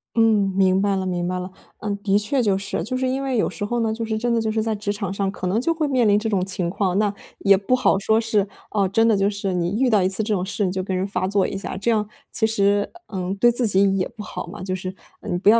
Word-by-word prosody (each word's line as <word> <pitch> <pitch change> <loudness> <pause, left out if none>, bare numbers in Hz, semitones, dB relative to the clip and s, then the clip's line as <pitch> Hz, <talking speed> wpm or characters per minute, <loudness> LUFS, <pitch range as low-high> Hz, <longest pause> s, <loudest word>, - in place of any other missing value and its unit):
嗯， 220 -4 +3
明 190 0 +4
白 200 -1 +1
了 190 - -2
明 175 -1 -1
白 180 +1 -2
了。 180 +1 -5 0.3
呃， 210 - -5
的 200 0 +3
确 245 +5 0
就 200 -3 +2
是， 195 -3 -3
就 255 +7 -2
是 260 0 0
因 265 +2 -1
为 265 -2 -1
有 - - +1
时 205 - -6
候 240 +4 -1
呢， 225 -1 0
就 230 +1 -4
是 220 -1 -2
真 240 +2 0
的 230 - +2
就 220 -1 -1
是 220 0 0
在 220 0 -1
职 205 0 -2
场 200 -2 -3
上 195 -1 -1
可 185 - -4
能 195 +5 +1
就 330 +6 +1
会 315 -2 -1
面 255 -4 +2
临 205 -1 +4
这 220 +1 -2
种 195 -4 +1
情 185 -2 -1
况。 190 -1 0
那 210 -1 +1 0.3
也 195 0 +5
不 200 +6 -1
好 255 -5 +3
说 220 +3 +2
是， 225 -3 +1 0.3
哦， 200 -2 +2
真 225 +4 +2
的 225 - +4
就 195 0 +2
是 200 -2 -3
你 180 +4 -1
遇 260 -1 +3
到 210 -5 +3
一 185 - +2
次 190 +3 -1
这 215 0 -1
种 185 -2 -1
事 200 +1 -1
你 180 - 0
就 185 0 -2
跟 190 0 -2
人 185 +1 -1
发 185 -2 -2
作 200 -1 +2
一 - - -5
下， 195 - -5
这 200 +5 -1
样 210 -2 +1 0.3
其 220 - +2
实， 205 -2 +1 0.2
呃， 185 -2 -3
对 240 - +6
自 240 +1 +1
己 195 -1 +3
也 185 - +1
不 235 -2 -10
好 - - -6
嘛， 180 +1 -9
就 185 0 -2
是， 185 0 -5 0.3
嗯， 175 - -3
不 195 - -3
要 225 +2 +7
205 Hz, 325 characters per minute, -22 LUFS, 190-225 Hz, 0.3 s, 要